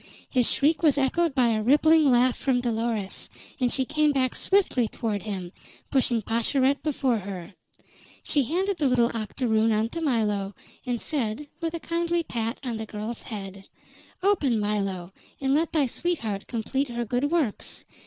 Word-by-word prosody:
His 250 -3 +2
shriek 305 +3 +2
was 300 -4 +4
echoed 285 +3 +1
by 250 -3 +4
a 220 -1 +1
rippling 300 +5 +5
laugh 245 0 +4
from 260 -2 +1
Dolores, 225 -4 -2 0.3
and 250 -2 +1
she 265 - +1
came 305 +2 +2
back 260 -2 0
swiftly 375 - +2
toward 210 -2 -3
him, 190 -4 -5 0.4
pushing 245 -4 +2
Pascherette 260 +5 +1
before 270 -6 0
her. 190 -2 -7 0.7
She 290 - +2
handed 375 - 0
the 295 - +2
little 240 -2 +3
octoroon 225 0 +1
on 220 +1 +1
to 330 - -5
Milo, 210 -8 0 0.3
and 245 -1 -1
said, 280 0 -2
with 330 0 -2
a - - -3
kindly 340 +1 -1
pat 230 -4 -2
on 235 -3 -2
the 220 0 -5
girl's 215 +3 -5
head: 195 -3 -7 0.5
"Open, 290 - +2
Milo, 195 -3 -2 0.3
and 270 0 +1
let 315 +3 +2
thy 305 -4 +3
sweetheart 235 - -2
complete 265 +4 -1
her 240 0 -3
good 250 +6 0
works. 305 -10 -1
245 Hz, 165 wpm, -26 LUFS, 220-290 Hz, 0.7 s, rippling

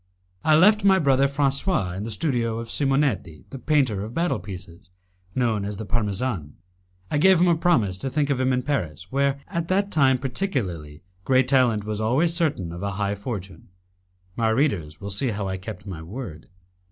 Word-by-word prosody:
I 155 - +5
left 205 +6 +5
my 195 -1 +6
brother 140 -4 +3
Francois 140 - 0
in 95 - -5
the 110 - -4
studio 115 -2 -1
of 115 0 -6
Simonetti, 135 - 0
the 135 - -7
painter 130 -10 +1
of 110 +4 -8
battle 175 +1 0
pieces, 90 -2 -10 0.5
known 115 -5 +1
as 100 0 -4
the 110 - -5
Parmesan. 105 - -2 0.6
I 150 - +1
gave 190 +2 +6
him 180 - +4
a 170 - +4
promise 120 - +1
to 135 - -3
think 145 +2 0
of 135 - 0
him 130 0 +2
in 125 0 0
Paris, 90 - -3
where, 140 0 +1
at 170 -3 -3
that 200 +2 +1
time 135 -4 +4
particularly, 105 - -3 0.2
great 130 +2 +3
talent 125 -6 +3
was 105 0 -3
always 135 +10 +2
certain 150 - -1
of 85 +1 -7
a 100 0 -2
high 100 0 -1
fortune. 100 -5 -6 0.7
My 115 -1 +1
readers 100 - 0
will 100 0 -6
see 105 +8 0
how 105 -4 -2
I 95 0 -3
kept 100 +1 -8
my 90 -6 -6
word. 90 - -8
120 Hz, 190 wpm, -24 LUFS, 100-140 Hz, 0.7 s, my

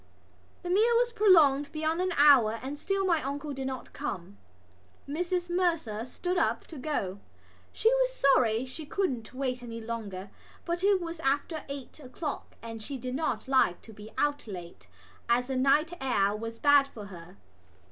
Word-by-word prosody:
The 355 - -4
meal 445 +5 +4
was 480 0 +1
prolonged 300 -9 +5
beyond 315 +2 -1
an 370 0 0
hour 255 -7 +6
and 270 +2 -4
still 390 +6 -1
my 335 -4 +2
uncle 285 +2 -4
did 265 -1 -4
not 260 -1 -6
come. 185 +2 -5 0.7
Mrs 350 +4 -1
Mercer 335 - 0
stood 355 +8 -2
up - - 0
to 315 - -8
go: 205 -9 -2 0.5
she - - 0
was - - +4
sorry 255 - +3
she 260 +5 -8
couldn't 265 - -2
wait 255 -1 -3
any 230 -1 -7
longer, 210 -4 -6 0.3
but 345 +1 -2
it 400 -1 +4
was 335 -1 -6
after 290 +2 -1
eight 280 +1 -8
o'clock 285 +2 -6
and 225 -1 -7
she 275 +5 -5
did 250 0 -5
not 310 0 -2
like 260 -10 +2
to 225 - -12
be 210 +1 -11
out 290 -3 0
late 175 -4 -9 0.4
as 240 +1 +3
the 265 +1 -3
night 285 +6 +3
air 205 -6 +2
was 225 +1 -6
bad 285 +1 +5
for 220 -6 -10
her. 180 -1 -12
275 Hz, 170 wpm, -29 LUFS, 230-330 Hz, 0.7 s, hour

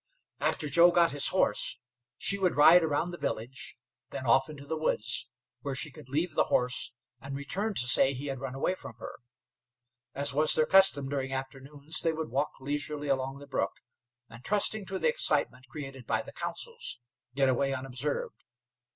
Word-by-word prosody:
After 150 - -1
Joe 170 +5 +6
got 170 -2 +3
his 145 0 +2
horse, - - +1 0.4
she 200 - -1
would 185 -2 +1
ride 165 +4 +7
around 160 +3 -1
the 175 - -9
village, 125 +4 -5 0.3
then 130 - -6
off 130 +3 +3
into 145 -2 -10
the 160 - -3
woods, 120 -7 0 0.3
where 140 0 -4
she 150 +3 -3
could 145 -3 -14
leave 160 +6 -1
the - - +2
horse 125 -1 0 0.3
and 140 +1 -7
return 195 +10 -2
to 125 - +5
say 130 +2 +5
he 135 +1 -6
had 135 -2 -4
run 135 -1 -6
away 135 +7 0
from 155 -10 -10
her. - - -10 1.0
As 140 0 +2
was 150 +2 +5
their 155 - +4
custom 190 -8 +5
during 135 -1 -3
afternoons, 140 +3 -1
they 165 -1 +1
would 160 -3 -5
walk 140 +4 0
leisurely 145 +1 -3
along 135 0 -1
the 145 - -12
brook, 140 - -2 0.5
and, 115 +1 -14
trusting 210 0 +1
to 190 - +1
the - - +1
excitement 135 - +1
created 135 -3 -9
by - - 0
the - - -12
councils, 470 - -3 0.4
get 135 -1 +3
away 135 +2 +1
unobserved. 135 +2 -4
140 Hz, 180 wpm, -29 LUFS, 135-160 Hz, 1.0 s, ride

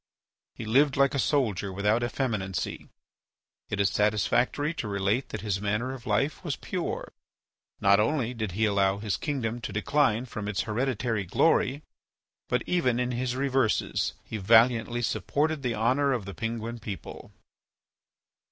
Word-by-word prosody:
He 115 - -6
lived 135 +5 +3
like 140 0 +4
a 140 - 0
soldier 105 - +1
without 105 +4 +1
effeminacy. 110 -7 -2 0.8
It 100 - -3
is 100 -1 +3
satisfactory 115 - +1
to 120 - -4
relate 100 +5 0
that 105 - -5
his 100 -2 -2
manner 105 +6 -1
of 125 -2 -10
life 110 - 0
was 150 -6 -2
pure. 175 +5 -4 0.7
Not 100 0 +5
only 125 +1 +1
did 110 -6 -4
he 110 +4 +1
not 105 - +2
allow 100 -1 +2
his 105 -1 -2
kingdom 120 -6 -3
to - - -5
decline 125 +1 +1
from 110 -4 -6
its 100 -2 -1
hereditary 115 -2 -1
glory, 135 - +2 0.7
but, 125 -1 +1
even 130 -9 +1
in 125 0 0
his 125 0 -2
reverses 130 -4 +1
he 110 - -5
valiantly 115 +3 +4
supported 150 +5 0
the 125 -3 -1
honour 130 +6 +2
of 115 -6 -2
the 100 - -6
Penguin 115 +1 -4
people. 100 -3 -8
115 Hz, 150 wpm, -28 LUFS, 105-130 Hz, 0.8 s, Not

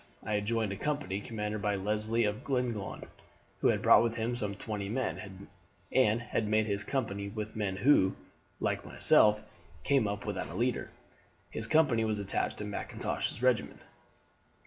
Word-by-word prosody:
I 105 - -2
had 105 0 0
joined 115 -2 0
a 100 - -4
company 145 -7 -2
commanded 105 -1 -4
by 105 0 +1
Leslie 105 +3 0
of 105 +5 -2
Glenlyon, 125 -7 -2 0.6
who - - +3
had - - +2
brought - - +8
with 115 -1 0
him 115 +1 -1
some 105 -4 -2
twenty 100 -1 -4
men, 100 -5 -4 0.4
and 115 -4 +4
had 115 -2 -1
made 110 +1 +3
up 105 - -3
his 100 0 -1
company 100 -6 -2
with 110 +1 -5
men 105 -3 -1
who, 95 -3 +4 0.4
like - - -1
myself, 105 0 +4 0.4
came 135 -6 +3
up 100 0 -4
without 105 -3 -3
a 85 - -7
leader. 120 +4 0 0.6
His - - -2
company 145 -8 +3
was 110 -1 0
attached 100 -1 -1
to 105 - -4
Mackintosh's 105 +3 -3
regiment. 125 -4 +1
105 Hz, 170 wpm, -31 LUFS, 100-120 Hz, 0.6 s, brought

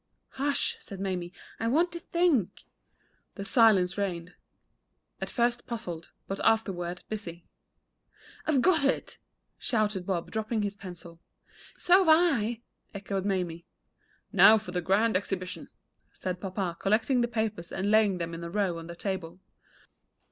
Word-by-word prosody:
"Hush!" 280 +1 0
said 195 - -10
Mamie; 180 -3 -3 0.3
"I 225 - -1
want 325 +9 +3
to 340 - -6
think." 330 - +1 0.7
Then 200 - -6
silence 205 -5 +4
reigned 180 -3 -3 0.9
at - - -3
first 240 0 0
puzzled, 180 -9 -5 0.2
but 195 - -4
afterward 180 -6 0
busy. 175 -6 -6 1.0
"I've 280 -5 +3
got 335 -5 +4
it!" 275 - -1 0.4
shouted 210 -5 0
Bob, 180 -4 -2
dropping 220 0 -1
his 200 0 -2
pencil. 175 -3 -11 0.6
"So've 365 -1 +5
I," 275 -9 +3 0.3
echoed 195 -1 -3
Mamie. 180 -4 -2 0.7
"Now 220 - +8
for 215 -3 -7
a 180 - +1
grand 205 +5 +2
exhibition!" 185 -1 -3 0.5
said 180 -1 -4
papa, 185 -3 -3
collecting 225 +5 +2
the 240 - +2
papers, 220 -7 -3
and 200 +2 -1
laying 215 -3 +4
them 170 -1 -4
in 165 +1 -6
a 170 - -5
row 185 -3 0
on 165 - -9
the 170 - -8
table. 180 -2 -4
200 Hz, 140 wpm, -29 LUFS, 180-230 Hz, 1.0 s, Now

